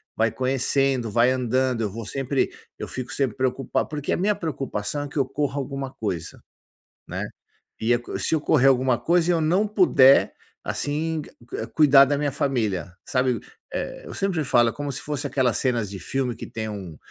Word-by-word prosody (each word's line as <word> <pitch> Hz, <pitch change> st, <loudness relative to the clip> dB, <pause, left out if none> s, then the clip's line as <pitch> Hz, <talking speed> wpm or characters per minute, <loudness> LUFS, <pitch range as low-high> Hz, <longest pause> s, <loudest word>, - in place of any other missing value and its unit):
vai 115 Hz, 0 st, +2 dB
conhecendo, 130 Hz, -1 st, 0 dB
vai 120 Hz, +4 st, +4 dB
andando, 130 Hz, -1 st, 0 dB
eu 105 Hz, -, 0 dB
vou 115 Hz, +2 st, -6 dB
sempre 135 Hz, +3 st, -1 dB, 0.3 s
eu -, -, -5 dB
fico 130 Hz, -2 st, -6 dB
sempre 135 Hz, -6 st, -1 dB
preocupado 130 Hz, 0 st, -1 dB
porque 145 Hz, -2 st, -3 dB
a -, -, 0 dB
minha 205 Hz, +3 st, +2 dB
preocupação 145 Hz, -, -3 dB
é -, -, -5 dB
que 140 Hz, -, -8 dB
ocorra 140 Hz, +1 st, -1 dB
alguma 135 Hz, -1 st, -4 dB
coisa, 90 Hz, -10 st, -4 dB, 0.7 s
né. -, -, -4 dB, 0.6 s
E 110 Hz, -, 0 dB, 0.3 s
se -, -, 0 dB
ocorrer 145 Hz, -3 st, +4 dB
alguma 130 Hz, -2 st, +2 dB
coisa 170 Hz, +7 st, +2 dB
e -, -, +5 dB
eu 165 Hz, -, +1 dB
não 180 Hz, +7 st, +2 dB
puder, 175 Hz, -10 st, +5 dB, 0.3 s
assim, 155 Hz, +2 st, -2 dB, 0.3 s
eh, -, -, -3 dB
cuidar 140 Hz, -3 st, +6 dB
da 145 Hz, -, +1 dB
minha 145 Hz, -1 st, -1 dB
família, 105 Hz, -, -1 dB
sabe? 125 Hz, -2 st, +1 dB, 0.7 s
Eu -, -, -8 dB
sempre 190 Hz, -5 st, 0 dB
falo, 120 Hz, -3 st, +4 dB
é -, -, -9 dB
como 145 Hz, -1 st, -4 dB
se 135 Hz, -, -5 dB
fosse 145 Hz, -1 st, -3 dB
aquelas 130 Hz, -4 st, +1 dB
cenas 120 Hz, -6 st, 0 dB
de 100 Hz, -, -6 dB
filme 130 Hz, +3 st, -2 dB
que -, -, -8 dB
tem 110 Hz, -1 st, -5 dB
um 95 Hz, -6 st, -7 dB
135 Hz, 180 wpm, -24 LUFS, 120-145 Hz, 0.7 s, cuidar